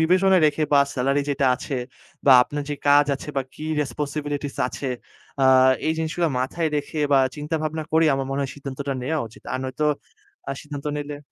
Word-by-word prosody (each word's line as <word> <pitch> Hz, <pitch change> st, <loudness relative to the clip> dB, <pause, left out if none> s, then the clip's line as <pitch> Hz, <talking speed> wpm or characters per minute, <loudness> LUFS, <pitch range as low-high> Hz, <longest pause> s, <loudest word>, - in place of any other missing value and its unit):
বিবেচনায় 185 Hz, +2 st, +4 dB
রেখে, 155 Hz, +1 st, 0 dB
বা 140 Hz, -, +7 dB
সেলারি 135 Hz, +2 st, +1 dB
যেটা 140 Hz, -1 st, +1 dB
আছে 135 Hz, 0 st, -4 dB, 0.5 s
বা 135 Hz, -, +9 dB
আপনার 145 Hz, +3 st, -4 dB
যে -, -, 0 dB
কাজ 145 Hz, 0 st, +6 dB
আছে 140 Hz, -, -9 dB
বা 135 Hz, -, +2 dB
কি 155 Hz, -, -8 dB, 0.2 s
রেসপনসিবিলিটিস 145 Hz, +1 st, -3 dB
আছে। 135 Hz, -, -5 dB, 0.5 s
আ -, -, +5 dB, 0.4 s
এই 160 Hz, -, +2 dB
জিনিসগুলো 160 Hz, +1 st, 0 dB
মাথায় 160 Hz, +5 st, -1 dB
রেখে 145 Hz, +2 st, -4 dB
বা 135 Hz, -, +6 dB, 0.2 s
চিন্তা 150 Hz, +2 st, -2 dB
ভাবনা 155 Hz, +1 st, -2 dB
করে, 160 Hz, +1 st, +4 dB
আমার 135 Hz, 0 st, -2 dB
মনে 135 Hz, +1 st, -1 dB
হয় 135 Hz, -, -3 dB
সিদ্ধান্তটা 140 Hz, 0 st, -5 dB
নেওয়া 155 Hz, +5 st, -1 dB
উচিত। 110 Hz, -, -17 dB
আর 130 Hz, -, -1 dB
নয়তো 130 Hz, +4 st, -2 dB, 0.7 s
আ -, -, 0 dB
সিদ্ধান্ত 145 Hz, -1 st, -7 dB
নিলে 145 Hz, 0 st, -5 dB
145 Hz, 185 wpm, -23 LUFS, 140-155 Hz, 0.7 s, বা